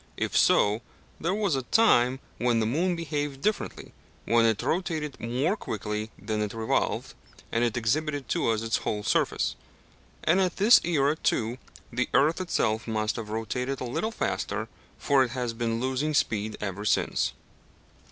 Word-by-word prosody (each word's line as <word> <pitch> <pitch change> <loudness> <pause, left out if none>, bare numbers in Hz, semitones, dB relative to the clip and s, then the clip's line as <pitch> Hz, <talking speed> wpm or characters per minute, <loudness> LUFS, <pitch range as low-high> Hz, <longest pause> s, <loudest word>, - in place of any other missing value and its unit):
If - - -2
so, 105 +3 +4 0.4
there 175 +4 0
was 205 -7 +1
a 135 - 0
time 130 - +3 0.2
when 120 0 +2
the 110 - +1
moon 170 +10 +1
behaved 145 -4 -3
differently 215 0 -2 0.3
when 115 0 +4
it 110 -2 0
rotated 160 -5 -2
more 130 - 0
quickly 105 - -4
than 105 +2 -3
it 105 0 -3
revolved, 110 0 -1 0.4
and 115 - +1
exhibited 145 +4 -1
to - - +1
us 110 -1 0
its 115 0 +1
whole 105 -1 -3
surface. - - +1 0.7
And 180 +5 +3
at 180 -2 0
this 215 +5 +7
era, 150 -3 +2
too, 120 -4 -1 0.3
the 125 +2 0
earth 150 +7 +3
itself 110 -11 0
must 110 -1 -1
have 110 -2 -5
rotated 125 +5 -2
a - - -4
little 125 - -2
faster, - - -2 0.3
for 140 -2 +3
it 125 - -3
has 125 -3 -2
been 115 0 -1
losing 130 +4 -1
speed 110 -6 0
ever 100 0 -4
since. 95 -6 +1
125 Hz, 160 wpm, -27 LUFS, 110-155 Hz, 0.7 s, this